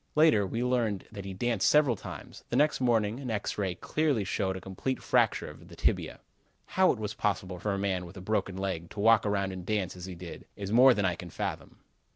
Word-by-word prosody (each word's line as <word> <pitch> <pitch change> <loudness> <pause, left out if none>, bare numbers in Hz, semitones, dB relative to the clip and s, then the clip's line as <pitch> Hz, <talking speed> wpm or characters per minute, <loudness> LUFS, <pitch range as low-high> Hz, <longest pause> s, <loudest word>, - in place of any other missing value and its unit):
Later, 150 -11 +5
we 115 +6 -2
learned 120 -6 0
that 100 -3 -8
he 95 - -5
danced 115 -1 +1
several 145 -5 +4
times. - - -9
The - - -2
next 150 -2 +3
morning 115 -2 +2
an 130 -3 -5
X 105 -1 -2
ray 95 -3 -1
clearly 145 - 0
showed 95 -1 -1
a - - -6
complete 95 +8 -3
fracture - - +2
of - - -12
the - - -12
tibia. - - -1 0.5
"How 185 0 +5
it - - -3
was 105 0 -4
possible 95 -4 -2
for 105 +3 -1
a - - -2
man, 95 -3 -1
with 95 - -12
a - - -6
broken 95 -1 -1
leg, 95 -4 -3
to 105 - -9
walk 110 0 +5
around 100 -1 0
and 95 -1 -7
dance, 95 -2 -1
as 90 0 -8
he 95 - -7
did, 85 -1 -9
is 100 -1 -5
more 125 +2 +7
than 100 - 0
I 90 - +2
can 85 +1 -8
fathom." - - -5
100 Hz, 230 wpm, -29 LUFS, 95-115 Hz, 0.5 s, more